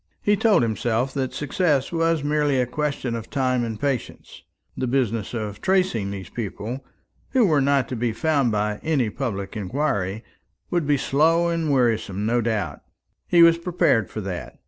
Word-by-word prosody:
He 205 - +4
told 205 - +3
himself 115 +3 -1
that 130 -2 -2
success 145 -1 0
was 165 -2 +1
merely 145 -2 +1
a 125 - +2
question 140 -1 -2
of 115 -1 -5
time 130 -3 0
and 110 -2 -4
patience. 135 -3 -4 0.3
The 130 - -2
business 120 -4 -1
of 105 -3 -5
tracing 185 - +1
these 95 -3 -6
people, 115 +3 -5 0.5
who 255 -4 +5
were 155 -6 +3
not 140 -2 +2
to 130 - -3
be 120 0 0
found 140 +1 +1
by 105 0 -1
any 135 -9 0
public 100 -7 -4
inquiry, 105 -2 -2 0.5
would 175 -4 0
be 145 -1 +3
slow 165 +6 +2
and 165 -2 -1
wearisome 115 -6 +1
no 120 +2 +2
doubt. 105 -10 -2 0.5
He 170 -1 +6
was 170 0 +6
prepared 170 - +1
for 110 - -5
that. 95 -3 -6
130 Hz, 170 wpm, -23 LUFS, 110-150 Hz, 0.5 s, He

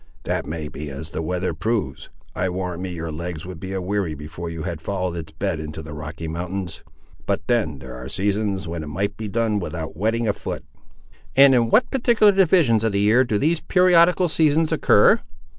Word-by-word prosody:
"That - - -2
may 80 0 -4
be 75 +1 -7
as 75 +4 -7
the - - -3
weather 90 +2 -2
proves. 85 - -2 0.2
I 95 - -1
warrant 90 -1 -4
me 95 -1 -4
your 85 -2 -5
legs 85 +1 -5
would 90 -2 -8
be 95 +2 -6
a 95 - -2
weary 95 -3 -2
before 80 +4 -7
you 85 -1 -6
had 85 -4 -4
followed 95 -1 -2
its 80 -2 -6
bed 85 +1 -2
into 80 0 -6
the 75 -1 -8
Rocky 75 +2 -6
Mountains; 90 +3 -5 0.4
but - - 0
then 110 - 0
there 65 -2 -9
are 65 +1 -8
seasons 100 +1 -1
when 85 0 -4
it 80 - -7
might 95 +7 -2
be 110 - -5
done 110 0 0
without 80 -3 -5
wetting 110 +5 0
a 105 - +2
foot." - - -6 0.7
"And 135 0 +8
in 120 -2 +3
what 235 - +3
particular 235 -5 +4
divisions 170 - +4
of 110 -2 +1
the 100 - +1
year 110 +5 +4
do 110 -5 0
these 160 +8 +1
periodical 180 0 +4
seasons 155 0 +2
occur?" - - +5
95 Hz, 205 wpm, -22 LUFS, 80-115 Hz, 0.7 s, And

